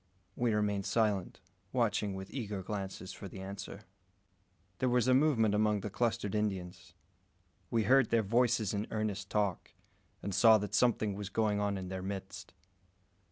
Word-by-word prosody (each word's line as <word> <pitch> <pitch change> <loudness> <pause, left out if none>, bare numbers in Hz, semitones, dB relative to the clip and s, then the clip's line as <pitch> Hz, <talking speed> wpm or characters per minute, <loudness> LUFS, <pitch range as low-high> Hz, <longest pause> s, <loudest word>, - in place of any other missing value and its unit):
We 120 -3 +1
remained 105 -2 0
silent, 105 -5 0 0.3
watching 100 -2 0
with 95 0 -7
eager 105 -7 -4
glances 95 -1 -5
for 100 - -8
the 95 - -9
answer. 95 +1 -7 1.0
There 130 - +2
was 125 0 +2
a 130 - +5
movement 130 -7 +3
among 105 -1 +2
the 105 - -5
clustered 115 -2 -1
Indians. 95 -4 -3 0.7
We 115 -1 +1
heard 130 +2 +4
their 115 -1 +3
voices 115 -1 +2
in 105 +1 -2
earnest 105 -3 -3
talk, 100 -4 -1 0.5
and 100 - -3
saw 110 +2 +7
that 105 -1 -5
something 110 -4 +2
was 100 0 -5
going 105 0 +1
on 100 -1 0
in 95 -1 -6
their 95 0 -4
midst. 95 0 -7
105 Hz, 160 wpm, -32 LUFS, 95-110 Hz, 1.0 s, saw